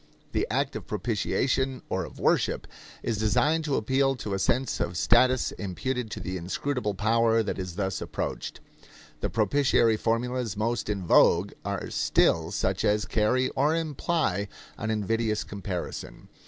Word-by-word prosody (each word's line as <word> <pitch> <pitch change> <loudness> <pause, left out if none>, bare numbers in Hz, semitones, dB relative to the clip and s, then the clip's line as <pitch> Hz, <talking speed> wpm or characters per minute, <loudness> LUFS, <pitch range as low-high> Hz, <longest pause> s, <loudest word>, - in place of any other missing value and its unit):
The - - 0
act - - 0
of - - -6
propitiation 130 0 -1
or - - -1
of - - -12
worship - - +1 0.4
is 110 -3 -1
designed 150 +9 +2
to 145 -3 0
appeal 135 +4 +2
to 105 -5 -5
a 95 - -1
sense 130 +6 0
of 85 - -2
status 125 +4 +4
imputed 120 +5 -3
to 110 - -5
the 95 -1 -4
inscrutable 105 +5 -2
power 115 +2 +3
that 100 - -3
is 90 -2 -5
thus 95 -1 -2
approached. - - -4 0.6
The - - -2
propitiatory 115 0 +3
formulas 115 -1 -1
most 115 +1 -1
in 100 -3 -2
vogue 85 +3 +5
are 100 -2 -3
still - - +2
such - - -1
as 105 0 +2
carry 115 +4 +1
or 150 +4 +1
imply 155 - -1 0.3
an 110 - -4
invidious 110 0 0
comparison. 100 -3 -6
110 Hz, 150 wpm, -27 LUFS, 100-130 Hz, 0.6 s, vogue